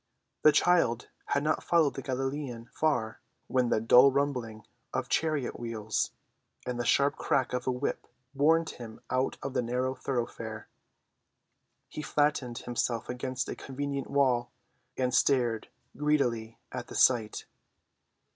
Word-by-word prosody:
The 155 - +7
child 145 -6 +2 0.2
had 140 - +1
not 155 +1 0
followed 165 -4 +3
the - - -5
Galilean 135 -2 -3
far 120 -8 0 0.2
when 125 -1 +1
the - - +2
dull 125 +5 +7
rumbling 125 -6 -2 0.3
of - - -2
chariot‐wheels 120 -8 -1 0.6
and 125 -1 -3
the 120 - -1
sharp 140 +3 +3
crack 130 -2 0
of 125 0 -2
a - - +3
whip 125 +3 -3 0.3
warned 160 +4 +3
him 115 -2 -10
out 130 +1 0
of 135 - -4
the - - +1
narrow 125 +2 -1
thoroughfare. 115 -4 -4 1.2
He - - -6
flattened 145 -5 0
himself 120 -1 -2
against 125 0 -3
a - - -4
convenient 140 0 -4
wall 125 -4 +2 0.5
and 125 -1 0
stared 120 -5 +2 0.3
greedily 120 -7 0
at 125 -1 -5
the - - -9
sight. 115 -4 +3
130 Hz, 135 wpm, -29 LUFS, 120-140 Hz, 1.2 s, The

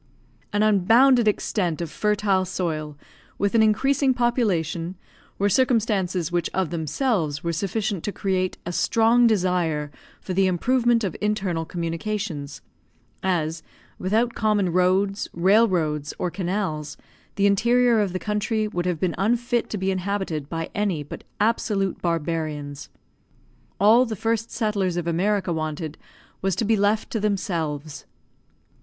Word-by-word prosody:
An 205 +1 +1
unbounded 225 +5 +5
extent 185 -5 0
of 170 -3 -4
fertile 210 -2 +1
soil, 155 -5 -3 0.4
with 200 0 0
an 230 - +5
increasing 265 +5 +3
population, 185 - 0 0.4
were 200 - +2
circumstances 200 -7 +1
which 175 -1 0
of 190 -4 0
themselves 160 - -1
were 170 0 -1
sufficient 200 +2 -2
to 205 - -1
create 185 -2 -1
a 175 - -3
strong 230 +6 +3
desire 175 -8 0 0.3
for 185 - -5
the 190 +1 +3
improvement 235 +5 +2
of 190 -5 -2
internal 195 -6 -1
communications; 170 -3 -4 0.6
as, 165 -3 -1 0.4
without 225 +6 +1
common 210 -4 +1
roads, 190 +2 +2
rail 200 +7 +4
roads, 155 -6 -1
or 180 - -2
canals, 175 -5 -3 0.4
the 200 - +2
interior 235 +4 +3
of 205 -3 0
the 185 - -2
country 215 +2 -1
would 180 -3 -3
have 175 -3 -1
been 180 -1 0
unfit 240 +3 +1
to 210 - -3
be 190 0 0
inhabited 185 -6 -3
by 165 -1 -4
any 200 -8 -1
but 145 - -9 0.2
absolute 210 -3 0
barbarians. 155 -4 -3 0.9
All 230 +5 +5
the 220 - -3
first 225 +2 -1
settlers 200 -6 -1
of 175 - -2
America 185 +2 0
wanted 155 0 -4 0.5
was 195 -2 0
to 225 - -1
be 225 +2 +3
left 205 +1 +1
to 225 - -1
themselves. 165 -8 -3
195 Hz, 135 wpm, -24 LUFS, 170-215 Hz, 0.9 s, unbounded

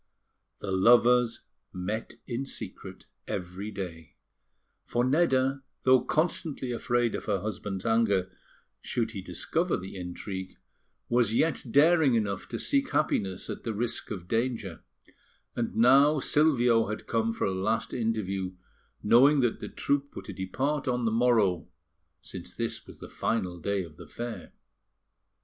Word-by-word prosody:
The 100 - -4
lovers 120 +4 +4 0.3
met 105 +5 -4
in 120 +1 -3
secret 135 - -8 0.2
every 95 +2 -4
day; 90 -6 -7 0.7
for 120 - 0
Nedda, 135 -2 +2 0.2
though 130 -1 +6
constantly 155 -3 -1
afraid 120 -1 0
of - - -4
her 100 -3 0
husband's 100 -1 -4
anger 100 -5 +2 0.5
should 115 -2 -2
he 100 -4 -6
discover 160 - -1
the 95 +1 -8
intrigue, 95 +1 -6 0.5
was 120 -2 +2
yet 160 +6 +1
daring 150 0 +5
enough 100 -4 -1
to - - -3
seek 275 -2 +1
happiness 95 -10 0
at - - -5
the 115 -2 -3
risk 120 +2 -3
of 90 -4 -6
danger; 115 -6 -2 0.7
and 120 -1 -2
now 140 +6 +6
Silvio 125 -6 +3
had 105 +1 -5
come 115 0 0
for 115 - -2
a - - 0
last 110 +4 -1
interview, 100 -6 -1 0.5
knowing 135 +7 +6
that 120 -3 0
the - - -6
troupe 140 0 -1
were - - -6
to - - -7
depart 135 +11 -2
on 125 -1 0
the 110 - +2
morrow, 110 -6 +2 0.5
since - - -8
this - - -3
was - - -12
the - - -8
final 90 -6 -2
day 100 +3 -1
of 80 -2 -13
the 85 - -11
fair. 115 +5 -7
115 Hz, 145 wpm, -28 LUFS, 95-130 Hz, 0.7 s, though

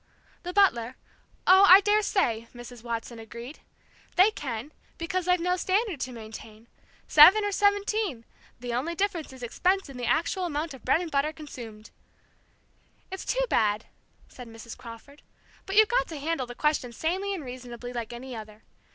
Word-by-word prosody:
"The 360 - -5
butler 255 - +2 0.5
oh, 380 +2 +7
I 375 +2 +11
dare 420 +1 +3
say!" 235 - 0
Mrs. 240 -1 -10
Watson 230 0 -5
agreed. 235 +5 -10 0.6
"They 380 +4 +6
can, 260 - -6 0.3
because 365 +1 -2
they've 360 0 +3
no 360 +2 0
standard 380 - 0
to 255 - -4
maintain 220 -1 -11 0.4
seven, 375 +8 +8
or 410 - -1
seventeen 405 - 0 0.3
the 245 -1 -5
only 295 +8 -2
difference 360 -6 -2
in 260 -1 -12
expense 365 +9 0
is - - -12
the 245 -1 -4
actual 360 +3 0
amount 315 -1 -3
of 265 - -13
bread 330 - +2
and 340 -3 -6
butter 285 +2 +1
consumed." 235 -9 -10 1.2
"It's 380 - -6
too - - 0
bad," 215 - +1 0.4
said 250 -2 -11
Mrs. 225 0 -10
Crawford. 235 +5 -12 0.5
"But 385 - -3
you've 435 0 +7
got 485 +3 +1
to 320 - -7
handle 290 -3 -2
the 245 - -9
question 300 -5 0
sanely 375 - -2
and 320 -7 -7
reasonably, 245 -1 -8
like 235 -2 -5
any 245 +1 -8
other. 215 -1 -10
285 Hz, 170 wpm, -27 LUFS, 235-370 Hz, 1.2 s, I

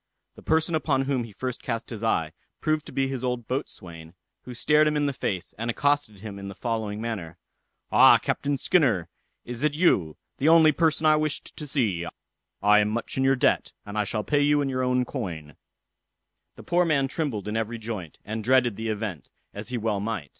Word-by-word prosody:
The - - -14
person 160 +1 +1
upon 140 -4 +1
whom 135 -3 -1
he 115 - -12
first 125 +4 -5
cast 115 -1 -4
his 115 -1 -6
eye, 80 -8 +1 0.3
proved 155 -1 -1
to - - -9
be 135 0 0
his 135 -2 -4
old 125 -2 -2
boatswain, 85 - -6 0.3
who 125 - -8
stared 150 +5 +4
him 150 0 +1
in 145 - +1
the 140 - 0
face, 95 -8 -3
and 115 +1 -2
accosted 140 -5 0
him 100 -2 -7
in 100 - -7
the 100 - -8
following 110 -3 -3
manner: 110 -8 -5 0.5
"Ah, - - +8
Captain 140 0 -1
Skinner, 120 - +2 0.4
is 120 0 -6
it 150 -1 +1
you? 95 - +2 0.2
the 145 - +3
only 160 -1 +7
person 160 0 +1
I 155 0 +6
wished 155 -1 -3
to 150 - -7
see: 110 - 0 0.6
I 105 +1 +6
am 105 0 +2
much 115 +1 -3
in 135 - +1
your 135 0 +4
debt, 125 - +1
and 105 - -8
I 105 - +1
shall 105 +1 -2
pay 145 +4 +1
you 145 +1 +4
all - - +2
in 135 - -1
your 130 -1 -1
own 125 0 +1
coin." 80 - -6 1.0
The - - -12
poor 175 +1 +2
man 145 -5 +2
trembled 135 - -3
in 105 - -3
every 115 +1 -2
joint, 110 -8 -6
and 110 +1 -4
dreaded 125 -3 +3
the 110 0 -3
event, 105 -6 -4 0.2
as 105 +4 -7
he 125 - -2
well 110 -3 -1
might. 100 -8 -4
120 Hz, 210 wpm, -26 LUFS, 105-145 Hz, 1.0 s, Ah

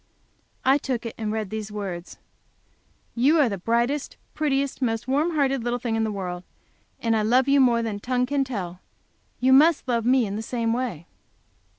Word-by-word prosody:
I 270 +2 +5
took 250 -4 -3
it, 230 - -4
and 215 -1 -2
read 215 -3 -3
these 215 -1 -5
words: 190 -4 -6 1.0
"You 280 +7 +3
are 285 - +5
the 200 -4 -3
brightest, 235 +8 -1 0.2
prettiest, 280 -3 -1
most 225 -2 -1
warm 300 +6 +1
hearted 275 -4 +1
little 240 +1 -1
thing 235 -2 -2
in 225 - +1
the 220 - -1
world. 180 -3 -5 0.6
And 230 -1 +1
I 220 - +2
love 245 +5 +3
you 280 0 +4
more 235 -2 +3
than 215 -3 -3
tongue 250 +3 0
can 280 +1 0
tell. 185 -9 -5 0.6
You 260 +1 +4
must 305 +2 +5
love 235 -2 +1
me 250 0 +3
in 200 -1 -4
the - - -3
same 230 0 -1
way." 235 -10 -3
235 Hz, 190 wpm, -24 LUFS, 215-265 Hz, 1.0 s, I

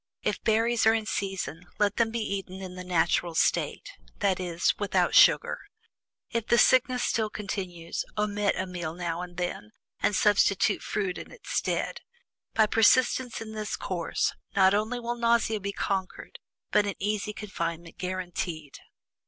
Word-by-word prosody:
If - - -1
berries 225 +1 +2
are 220 - +6
in 220 -1 -2
season, 180 -5 -3
let 205 -1 +1
them 230 -1 +3
be 230 +1 -3
eaten 195 -3 -4
in 185 -1 -7
the 180 0 -7
natural 175 -1 +1
state - - +1 0.3
that 190 -2 +1
is, 175 -2 +1
without 205 -2 +1
sugar. - - +5 0.7
If 230 -1 -2
the 235 - +4
sickness 255 0 +4
still 220 -2 0
continues, 185 -5 -4
omit 210 -1 +1
a 185 - -1
meal 175 -3 -5
now 170 -1 -3
and 175 -1 -8
then, 175 -12 -3 0.3
and 210 - +1
substitute 200 0 +3
fruit 195 -4 -2
in - - -10
its - - -11
stead. - - -1 0.5
By 220 - +5
persistence 240 +3 +3
in 220 -1 -7
this 215 -1 -3
course, 175 -3 -1 0.2
not 190 0 +5
only 215 +4 0
will 240 0 -2
nausea 230 -2 +2
be 200 0 -3
conquered, 190 -2 -4 0.3
but 205 - +3
an 200 - -2
easy 210 +1 -1
confinement 170 -5 -5
guaranteed." 175 -5 -4
200 Hz, 155 wpm, -28 LUFS, 180-220 Hz, 0.7 s, are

